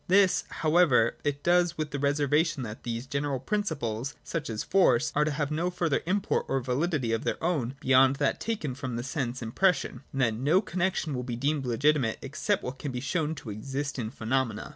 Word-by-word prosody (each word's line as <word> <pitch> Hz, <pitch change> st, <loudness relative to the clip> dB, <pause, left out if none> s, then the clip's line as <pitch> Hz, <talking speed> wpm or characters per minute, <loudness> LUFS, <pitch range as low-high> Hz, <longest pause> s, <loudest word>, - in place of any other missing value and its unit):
This, 190 Hz, 0 st, +4 dB
however, 155 Hz, -8 st, +3 dB
it 145 Hz, -1 st, -2 dB
does 175 Hz, -1 st, +3 dB
with 155 Hz, -1 st, -3 dB
the 140 Hz, -, -3 dB
reservation 145 Hz, +1 st, +1 dB
that 110 Hz, -1 st, -7 dB
these 115 Hz, +1 st, -4 dB
general 140 Hz, 0 st, -2 dB
principles 135 Hz, -, -2 dB
(such 160 Hz, -5 st, -4 dB
as 110 Hz, -1 st, -3 dB
force), 155 Hz, -9 st, +3 dB
are 150 Hz, -, +3 dB
to -, -, +1 dB
have 145 Hz, 0 st, -2 dB
no 165 Hz, +4 st, 0 dB
further 170 Hz, -5 st, 0 dB
import 195 Hz, +2 st, 0 dB
or 135 Hz, -, +1 dB
validity 130 Hz, 0 st, -1 dB
of 115 Hz, 0 st, 0 dB
their -, -, -1 dB
own 140 Hz, -7 st, 0 dB
beyond 130 Hz, -1 st, +5 dB
that 140 Hz, 0 st, 0 dB
taken 205 Hz, -, -2 dB
from 130 Hz, -2 st, -5 dB
the 120 Hz, -, -3 dB
sense 130 Hz, -2 st, -3 dB
impression, 155 Hz, +9 st, +1 dB
and 135 Hz, -, -2 dB
that 115 Hz, -4 st, +3 dB
no 145 Hz, +11 st, +3 dB
connexion 185 Hz, -5 st, -1 dB
shall 125 Hz, -, -2 dB
be 125 Hz, -1 st, -4 dB
deemed 140 Hz, +2 st, -1 dB
legitimate 125 Hz, -1 st, +2 dB
except -, -, -1 dB
what 130 Hz, +1 st, -5 dB
can 145 Hz, -, -4 dB
be 125 Hz, -, -3 dB
shown 155 Hz, +4 st, -1 dB
to 135 Hz, -7 st, -7 dB
exist 135 Hz, +6 st, -4 dB
in 110 Hz, -3 st, -2 dB
phenomena. 115 Hz, -1 st, -2 dB
140 Hz, 200 wpm, -28 LUFS, 125-160 Hz, -, beyond